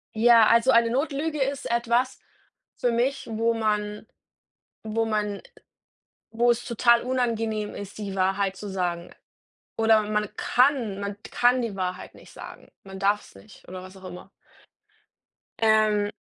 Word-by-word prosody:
Ja, 230 0 +6
also 230 +3 +4
eine 235 -2 +4
Notlüge 295 +3 -1
ist 275 0 -2
etwas 235 +2 0 0.6
für 245 - 0
mich, 245 +4 -1
wo 225 +1 +1
man 210 -1 -2 0.8
wo 225 +1 -1
man 210 -2 -2 0.9
wo 235 +2 +2
es 240 0 0
total 235 0 +3
unangenehm 225 -4 -2
ist, 200 -1 -8
die 200 -2 -5
Wahrheit 195 0 0
zu 205 - -7
sagen. 175 -3 -3 0.7
Oder 220 -1 +4
man 210 0 -2
kann 250 -6 +1
man 200 0 -4
kann 245 +1 +3
die 230 -5 -4
Wahrheit 185 -1 -4
nicht - - -16
sagen. - - -12
Man 190 0 -10
darf's 200 +2 -1
nicht 210 - -17
oder 185 0 -8
was 185 +1 -12
auch 190 - -16
immer. 180 +1 -10 1.3
Ähm, 215 -2 +3
220 Hz, 140 wpm, -25 LUFS, 200-235 Hz, 1.3 s, Ja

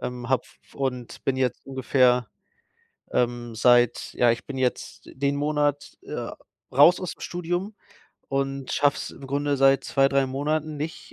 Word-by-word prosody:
Ähm, 125 -1 -5
habe 130 -2 +2
f - - -23
und 125 -3 -4
bin 135 - +1
jetzt 130 -1 -1
ungefähr, 125 -3 +2 0.8
ähm, 120 -1 -1
seit 120 +1 +3
ja, 120 -1 +4
ich 115 - -4
bin 140 - -6
jetzt 130 -1 -2
d - - -13
den 140 +1 0
Monat, 145 0 -1
äh, - - -5 0.4
raus 145 +7 +7
ausm 185 -3 -6
Studium 175 +4 -3 0.5
und 135 0 -2
schaffe 145 0 +3
es - - -5
im 135 - -11
Grunde 145 +1 0
seit 135 0 +4
2, 135 -1 +3
3 135 -1 +2
Monaten 150 +3 -2
nicht,, 155 +3 -6
135 Hz, 160 wpm, -25 LUFS, 125-145 Hz, 0.8 s, raus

